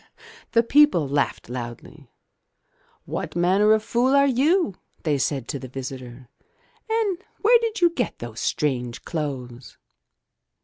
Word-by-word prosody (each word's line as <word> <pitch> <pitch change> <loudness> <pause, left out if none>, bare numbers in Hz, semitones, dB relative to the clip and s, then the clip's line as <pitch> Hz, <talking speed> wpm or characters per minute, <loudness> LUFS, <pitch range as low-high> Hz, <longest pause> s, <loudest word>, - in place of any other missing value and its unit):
'* 460 0 -21
The 230 0 +5
people 295 - +5
all 140 - -4
laughed 140 0 -1
loudly. 120 +3 -8 1.0
"What - - -5
manner 190 +5 +3
of 215 0 +1
fool 250 +4 +2
are 280 0 +5
you?'* 280 - +2 0.3
they 150 -4 +1
said 135 -2 -1
to 140 - -3
the 130 - -8
visitor, 130 -1 -8 0.6
"and 440 -5 +1 0.2
where 470 +3 +6
did 455 -2 -3
you 345 -1 +5
get 250 -9 -2
those 120 -1 -8
strange 125 -5 -2
clothes?" 130 -6 -5
160 Hz, 140 wpm, -24 LUFS, -, 1.0 s, where